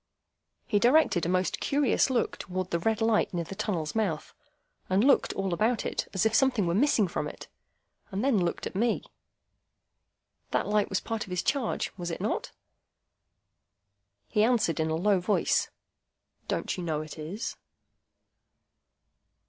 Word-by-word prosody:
He 205 - +2
directed 240 - +4
a - - -1
most 185 0 0
curious 280 -1 +2
look 250 -3 0
towards 185 0 -4
the 170 - +1
red 220 +5 0
light 225 -1 +2
near 170 - 0
the 165 - -8
tunnel's 175 -6 -2
mouth, 195 -9 -1 0.6
and 190 +3 +3
looked 275 +1 +4
all 195 -2 -2
about 220 +5 +1
it, - - -2
as 190 +2 0
if 220 - +2
something 245 -5 +3
were 170 - 0
missing 225 -1 +3
from 170 - -3
it, - - -9 0.6
and 200 +4 -2
then 225 -10 +3
looked 170 - -2
at - - -5
me. 225 +4 +1 1.5
That - - 0
light 210 0 +1
was 190 - 0
part 225 -2 -3
of - - -14
his 180 -1 -1
charge? 275 -6 -1
Was 175 -2 -4
it 165 - -4
not? - - -2 1.8
He 210 - +2
answered 220 -9 +2
in 160 0 +1
a 160 - 0
low 195 +3 +2
voice,—"Don't 185 +4 -3
you 180 - -4
know 155 -3 -1
it 155 +1 -10
is?" 170 +8 -5
200 Hz, 155 wpm, -28 LUFS, 175-225 Hz, 1.8 s, directed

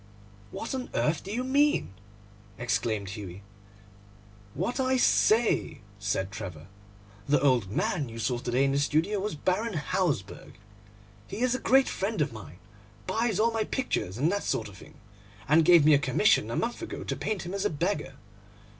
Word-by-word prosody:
'What 225 - -5
on 260 -1 -4
earth 150 0 +1
do 195 - -7
you 240 +4 -1
mean?' 280 - +2 0.6
exclaimed 110 -4 -1
Hughie. 100 -2 -8 1.1
'What 215 - -2
I 260 0 +2
say,' 230 - +2 0.2
said 100 -1 -2
Trevor. 90 -6 -7 0.6
'The 145 0 +3
old 130 -8 +2
man 140 - -1
you 115 - -9
saw 120 +1 -1
to 120 - -5
day 130 +3 +2
in 135 - +1
the 140 - +1
studio 160 +8 +1
was 205 -2 -3
Baron 190 +7 -1
Hausberg. 150 - -2 0.7
He 215 - -6
is 255 -1 +2
a 255 - -1
great 265 +1 +4
friend 200 +1 -2
of 145 -5 0
mine, 90 -7 -10 0.5
buys 225 - 0
all 230 +2 +3
my 225 -1 0
pictures 160 - -2
and 150 +7 +2
that 200 0 -1
sort 110 - -1
of 100 - -14
thing, - - -15 0.5
and 160 +2 +5
gave 170 -2 +6
me 155 - +7
a 140 - +5
commission 135 - +2
a 115 - -3
month 240 +7 -2
ago 340 - -6
to - - -3
paint 215 -3 -3
him 180 - -5
as 200 - -2
a - - +2
beggar. 150 - -2
155 Hz, 180 wpm, -28 LUFS, -, 1.1 s, me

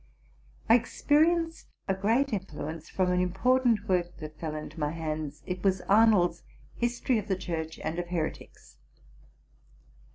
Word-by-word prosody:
Texperienced 315 +8 +3 0.2
a 195 - +2
great 225 +8 +1
influence 160 -4 -5
from 185 -1 +1
an 180 - +2
important 225 +4 +2
work 175 -2 0
that 155 -1 -9
fell 155 -2 -4
into 155 +1 -7
my 150 -1 0
hands: 155 -2 -4
it 180 0 -4
was 190 -2 +2
Arnold's 200 -5 +4 0.2
'+ - - -27
History 240 0 +1
of 210 - -7
the 190 -3 0
Church 160 -3 -4
and 160 +2 -2
of 175 - -3
Heretics. 170 -3 -5
185 Hz, 140 wpm, -28 LUFS, 160-225 Hz, 0.2 s, Arnold's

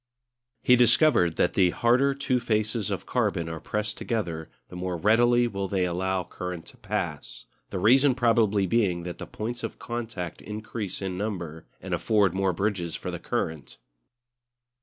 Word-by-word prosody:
He 125 - +6
discovered 120 - +4
that - - +2
the 95 -2 +4
harder 125 +8 +3
two 130 -2 0
faces 110 -2 0
of 100 - -3
carbon 100 -9 0
are 80 -1 -5
pressed 105 +6 -3
together 85 -9 -3 0.2
the - - -10
more 90 0 -3
readily 120 +6 +4
will 100 -3 -3
they 95 -1 0
allow 90 +1 -1
current 90 -1 -6
to - - -15
pass; - - -4 0.2
the 100 - -4
reason 130 +7 +5
probably 115 -5 +3
being 95 -4 +1
that 90 0 -6
the - - -6
points 120 +3 -5
of - - -5
contact 115 -8 -5
increase 105 -2 -5
in 95 -1 -3
number 85 -7 -4
and - - -5
afford 105 -5 +2
more 95 0 +1
bridges 90 -2 -2
for - - -5
the - - -5
current. 80 -5 -3
100 Hz, 160 wpm, -26 LUFS, 90-115 Hz, 0.2 s, He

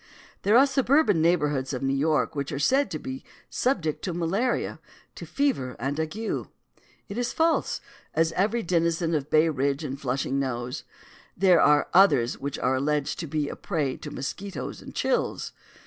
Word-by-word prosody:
There 210 +4 +4
are 270 - +7
suburban 270 - +3
neighborhoods 150 -5 +1
of 130 - -3
New 135 0 +1
York 150 +3 +1
which 140 -1 -3
are - - -3
said 265 - +2
to - - -3
be 265 0 -7 0.3
subject 170 - 0
to 180 -3 -3
malaria, 195 +9 -1 0.3
to - - -9
fever 255 - -1
and 140 +5 -3
ague. 160 +4 -2 0.9
It 205 +3 -5
is 245 - -1
false, 325 0 +1 0.3
as 165 +1 +2
every 215 +7 0
denizen 170 -1 +1
of 150 -2 -1
Bay 155 +1 +4
Ridge 140 0 -1
and 135 -1 -5
Flushing 135 +1 -1
knows. 125 -2 -3 0.5
There 185 -2 +5
are 150 0 +4
others 145 -11 +4
which 140 0 -4
are 125 +1 +1
alleged 150 +3 -1
to 170 - -4
be 150 0 -1
a - - -5
prey 150 -8 -2
to 150 - -8
mosquitoes 190 +8 -5
and - - -11
chills. - - -1
160 Hz, 170 wpm, -26 LUFS, 140-200 Hz, 0.9 s, are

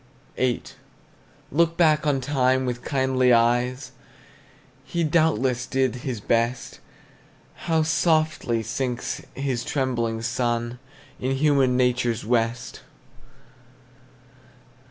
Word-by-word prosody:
VIII. 125 -2 0 0.9
Look 165 +3 +2
back 155 -3 +3
on 135 -2 +1
time 130 -1 +1
with 120 -1 -4
kindly 130 -2 +2
eyes, 120 +3 +2 0.9
He 170 +4 -2
doubtless 135 -6 +1
did 130 -1 0
his 125 -2 -4
best; 115 +3 -1 0.9
How 160 -1 +3
softly 155 -8 +1
sinks 120 +2 -3
his 135 -3 -2
trembling 120 -5 -1
sun 120 0 -1 0.4
In 130 +1 -1
human 135 -3 +3
nature's 125 -3 +1
west! 115 0 -1
130 Hz, 95 wpm, -24 LUFS, 120-140 Hz, 0.9 s, back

